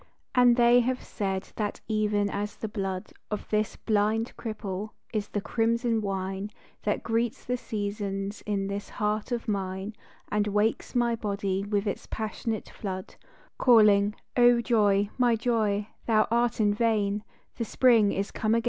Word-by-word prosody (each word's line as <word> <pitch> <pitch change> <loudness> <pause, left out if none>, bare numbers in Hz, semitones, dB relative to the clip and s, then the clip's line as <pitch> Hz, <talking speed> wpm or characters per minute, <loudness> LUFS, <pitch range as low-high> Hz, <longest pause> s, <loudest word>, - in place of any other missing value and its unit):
And 245 -2 +6
they 240 0 +6
have 250 +1 0
said 195 -2 -3
that 210 -2 -2
even 210 -2 +1
as 205 0 -3
the 220 - -4
blood 195 -3 -4 0.2
Of 210 - -4
this 215 0 +1
blind 220 +2 0
cripple 215 -3 -5 0.2
is 210 -2 -1
the 205 - -3
crimson 230 +1 +1
wine 195 0 -3 0.3
That 210 - -1
greets 230 +2 -1
the 250 - 0
seasons 205 -3 -4
in 200 -2 0
this 200 +1 -4
heart 210 +3 -2
of 235 -1 -2
mine 195 0 -2 0.4
And 210 0 +1
wakes 210 +4 0
my 240 -1 +2
body 200 -3 -2
with 205 0 -1
its 200 - -3
passionate 220 0 -3
flood, 190 -2 -6 0.5
Calling, 210 -4 +5 0.2
"Oh 245 -1 +6
joy, 205 -4 +2
my 240 -2 +4
joy, 215 -3 0 0.2
thou 215 -2 +4
art 235 0 +2
in 205 -1 +3
vain, 210 -2 +1 0.3
The 235 - -1
spring 225 -3 +4
is 200 +2 -2
come 220 +1 +1
again - - +4
210 Hz, 155 wpm, -28 LUFS, 200-230 Hz, 0.5 s, And